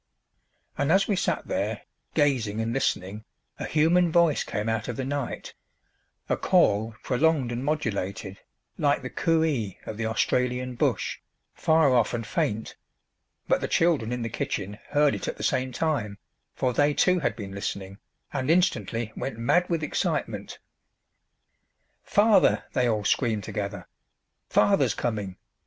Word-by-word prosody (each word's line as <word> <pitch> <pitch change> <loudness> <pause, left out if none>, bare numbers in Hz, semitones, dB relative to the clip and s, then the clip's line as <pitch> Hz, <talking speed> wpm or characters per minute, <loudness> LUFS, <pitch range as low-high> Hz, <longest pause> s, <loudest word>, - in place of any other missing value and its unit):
And 140 +2 +2
as 195 +2 +4
we 205 - +1
sat - - -1
there, - - -2 0.3
gazing 125 -8 +1
and 115 +1 -1
listening, 105 -5 -1 0.4
a - - -3
human 165 +3 +3
voice 170 -3 +3
came 105 +1 -3
out 110 -1 -1
of 120 - -3
the 130 - -3
night 140 -2 -4 0.7
a - - +1
call 110 +2 +2
prolonged 140 -1 +2
and 120 +2 -3
modulated 100 -9 -2 0.4
like 145 -2 +2
the 130 - -5
coo 165 -1 +2
ee 115 - -1
of 110 - -6
the 115 0 -1
Australian 125 +2 0
bush, 120 - -1 0.3
far 160 -4 +3
off 120 -1 +2
and 115 -1 -4
faint; 110 0 -2 0.7
but - - +2
the - - -1
children 155 -9 +2
in 125 -1 -2
the 115 - -2
kitchen 105 -1 -4
heard 145 0 +3
it - - -4
at - - -3
the - - -6
same 130 -1 0
time, 120 -8 -1 0.4
for 125 -1 0
they 145 +3 +2
too 180 -1 +3
had 145 - -1
been 100 -4 -7
listening, 100 0 -5 0.3
and 130 +2 -2
instantly 120 - +1
went 135 -5 -4
mad 175 +10 +2
with 165 -3 0
excitement. 150 - -2 1.5
"Father!" 210 +1 +4
they 125 -2 +2
all 105 -2 -1
screamed 110 -2 +1
together. 100 -1 -5 0.6
"Father's - - +3
coming!" 105 -6 -3
125 Hz, 150 wpm, -26 LUFS, 110-150 Hz, 1.5 s, as